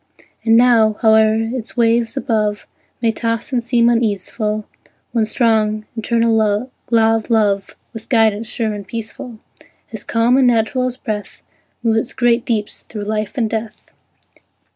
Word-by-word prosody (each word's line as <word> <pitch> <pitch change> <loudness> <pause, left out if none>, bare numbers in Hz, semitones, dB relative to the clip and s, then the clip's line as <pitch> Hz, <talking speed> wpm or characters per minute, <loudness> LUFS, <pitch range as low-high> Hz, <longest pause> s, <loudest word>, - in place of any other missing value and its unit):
And 225 0 +4
now, 230 -3 +5
howe'er 220 -1 +5
its 225 +2 -4
waves 230 +2 +2
above 215 -6 -1 0.4
May 225 - +3
toss 230 +4 -3
and 240 -2 0
seem 235 0 +2
uneaseful, 215 -1 -1 0.5
One 225 -3 +1
strong, 215 -2 +1
eternal 230 0 +1
law 220 +3 +1 0.5
of - - -18
Love, 205 -4 +1 0.2
With 225 -1 -10
guidance 225 -2 +2
sure 220 -2 -2
and 200 -2 -8
peaceful, 230 +2 -7 0.6
As - - -6
calm 235 +3 +2
and 265 -2 +4
natural 240 +2 +1
as 250 0 -5
breath, 215 -5 -6 0.4
Moves 225 -1 +2
its 230 - -5
great 240 -1 +2
deeps 215 -3 -2
through 210 -2 -8
life 215 +2 -3
and 230 -3 +1
death. 220 0 -6
225 Hz, 145 wpm, -18 LUFS, 215-235 Hz, 0.6 s, now